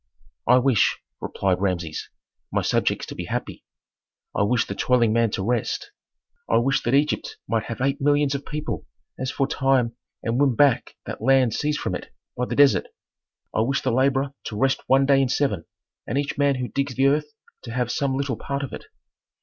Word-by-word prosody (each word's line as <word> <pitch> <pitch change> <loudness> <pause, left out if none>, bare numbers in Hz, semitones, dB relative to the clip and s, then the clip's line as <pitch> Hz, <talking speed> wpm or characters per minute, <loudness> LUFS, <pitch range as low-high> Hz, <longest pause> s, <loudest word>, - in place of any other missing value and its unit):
'" - - -38
"I 125 +2 +7
wish," 125 -5 +3 0.2
replied 95 -2 -1
Rameses, 85 -5 -2 0.4
"my - - 0
subjects - - +1
to - - -7
be - - -5
happy; - - -4 0.7
I - - +1
wish 115 +3 +2
the - - -4
toiling 120 0 +2
man 115 0 +3
to 95 - -1
rest; 120 - -1 0.6
I - - +4
wish 135 +4 +2
that 120 +3 +1
Egypt 150 +2 0
might 115 -1 0
have 115 - -5
eight 135 +1 0
millions 145 0 +3
of 140 0 -3
people 150 +1 -5 0.3
as 130 0 -2
aforetime 135 -3 +1 0.3
and 115 +3 0
win 140 -4 +3
back 140 -1 +3
that - - -6
land 130 -1 +4
seized 150 +3 -1
from - - -2
it - - -6 0.2
by 125 - -1
the - - -3
desert; 140 -1 +5 0.7
I - - 0
wish 135 +5 0
the 130 - +1
laborer 135 +2 +2
to 105 - -5
rest 135 +4 +2
one 135 +1 +4
day 135 0 +4
in 135 - +1
seven 105 - 0 0.4
and 120 - -1
each 145 0 -1
man 140 -1 +2
who 125 -1 -3
digs 140 +3 -2
the 135 - +2
earth 150 +2 +3 0.3
to 115 - -8
have 125 0 -1
some 135 -2 0
little 140 -4 -1
part 140 +4 -3
of 135 - -6
it." - - -7
130 Hz, 200 wpm, -24 LUFS, 115-140 Hz, 0.7 s, I